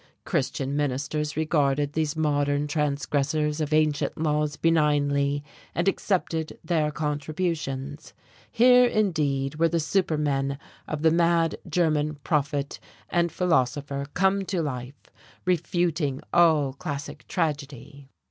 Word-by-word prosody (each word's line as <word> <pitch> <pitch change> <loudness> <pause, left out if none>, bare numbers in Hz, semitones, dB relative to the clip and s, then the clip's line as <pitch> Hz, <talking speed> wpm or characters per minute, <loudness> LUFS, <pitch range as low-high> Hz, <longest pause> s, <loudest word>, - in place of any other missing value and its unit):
Christian 135 +1 -1
ministers 150 +1 -2
regarded 145 -2 +1
these 155 -1 -1
modern 145 -2 +1
transgressors 150 +1 0
of 155 0 -2
ancient 155 -1 +1
laws 150 -1 0
benignly 145 -3 +2 0.3
and 170 - 0
accepted 170 -5 -1
their 155 -2 +1
contributions. 150 -1 -3 0.4
Here, 250 +1 +6
indeed, 150 - 0
were 165 0 +4
the 170 - 0
supermen 150 -5 0 0.3
of 155 0 -4
the 160 - +5
mad 170 0 +2
German 155 -2 +1
prophet 145 -1 -1 0.3
and 170 -1 +2
philosopher 140 -4 0
come 195 +1 +2
to 180 -3 -1
life, 130 -2 -5 0.5
refuting 170 -5 0
all 155 -6 +4
classic 140 0 -6
tragedy. 140 -4 -4
150 Hz, 110 wpm, -26 LUFS, 145-165 Hz, 0.5 s, Here